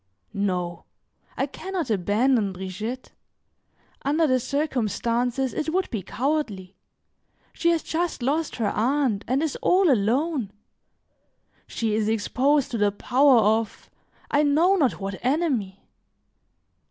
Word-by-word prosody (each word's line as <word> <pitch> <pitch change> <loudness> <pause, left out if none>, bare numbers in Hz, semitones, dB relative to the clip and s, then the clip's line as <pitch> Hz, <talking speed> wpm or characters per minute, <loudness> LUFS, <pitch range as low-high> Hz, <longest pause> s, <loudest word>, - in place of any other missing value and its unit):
"No, 180 -4 -2 0.5
I - - +1
can 380 - -8
not 330 -10 -2
abandon 210 +2 +1
Brigitte; 190 +7 -6 0.9
under 300 +4 +2
the 255 -3 +2
circumstances 250 -2 -1
it 310 - -2
would 370 +2 -1
be 220 -5 -2
cowardly. 210 - -3 0.8
She 340 - +1
has 335 -2 +1
just 335 -5 -2
lost 300 +5 0
her 220 -4 0
aunt, 245 -3 0
and 260 +5 +1
is 315 - -2
all 365 -3 +4
alone; 245 - 0 1.1
she 225 -2 -2
is 215 0 0
exposed 260 +6 +1
to 230 - -2
the 205 0 +3
power 260 +5 +4
of, 220 +1 0 0.4
I 290 - +3
know 315 +6 +3
not 280 - +1
what 195 -1 -6
enemy. 255 - -1
250 Hz, 125 wpm, -24 LUFS, 210-295 Hz, 1.1 s, all